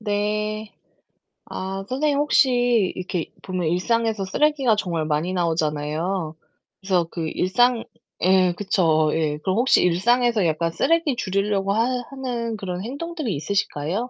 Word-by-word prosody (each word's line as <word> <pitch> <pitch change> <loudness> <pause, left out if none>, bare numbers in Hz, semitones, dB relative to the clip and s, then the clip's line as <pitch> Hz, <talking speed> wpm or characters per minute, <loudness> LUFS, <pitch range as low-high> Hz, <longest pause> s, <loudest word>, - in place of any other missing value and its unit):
네. 210 0 -2 0.7
아, 195 +1 -5
선생님 280 +2 +1
혹시 245 -7 +3
이렇게 180 -2 -4
보면 185 -3 -2
일상에서 220 +4 0
쓰레기가 270 +2 +2
정말 170 -6 -2
많이 155 +4 -1
나오잖아요. 160 0 -1 0.5
그래서 185 -3 +1
그 165 -2 -3
일상 235 +8 +2 0.4
예, 185 -1 +4
그쵸. 160 -6 +2
예. 155 -2 0
그럼 185 +5 -1
혹시 250 +3 +4
일상에서 225 +4 +2
약간 165 +1 0
쓰레기 305 - +1
줄이려고 195 -1 0
하 225 +2 +2 0.3
하는 245 -4 -3
그런 180 -3 -5
행동들이 285 - -4
있으실까요? 185 - -2
195 Hz, 300 characters per minute, -23 LUFS, 175-235 Hz, 0.7 s, 예